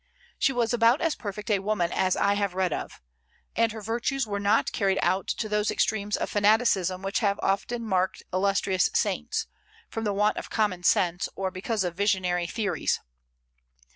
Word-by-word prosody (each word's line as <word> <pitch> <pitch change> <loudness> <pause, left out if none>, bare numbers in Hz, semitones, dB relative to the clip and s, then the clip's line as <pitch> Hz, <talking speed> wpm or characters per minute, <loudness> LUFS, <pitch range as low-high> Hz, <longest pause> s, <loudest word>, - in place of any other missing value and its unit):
She - - +3
was 240 -2 0
about 235 +2 +4
as 330 -2 +1
perfect 210 +1 -5
a 200 - +3
woman 195 -4 0
as 185 -1 +1
I 200 - +3
have 200 -2 -1
read 185 -4 +1
of; - - -6 0.6
and 230 -1 +2
her 220 -1 -8
virtues 235 +4 -1
were 200 -2 -3
not 205 +3 +2
carried 195 -2 +1
out 185 +2 +1
to 220 - -2
those 210 0 0
extremes 210 -1 0
of - - -2
fanaticism 205 -3 +2
which 195 +3 -1
have 200 -3 +1
often 230 +5 -1
marked 190 -2 0
illustrious 190 0 +2
saints, 450 -1 0 0.5
from 225 - -3
the 210 - 0
want 210 +2 +1
of - - -6
common 205 -5 0
sense 175 -1 +2
or 190 -1 -2
because 200 +3 -2
of 175 -2 -2
visionary 180 -2 0
theories. 205 -4 -1
205 Hz, 175 wpm, -27 LUFS, 190-225 Hz, 0.6 s, about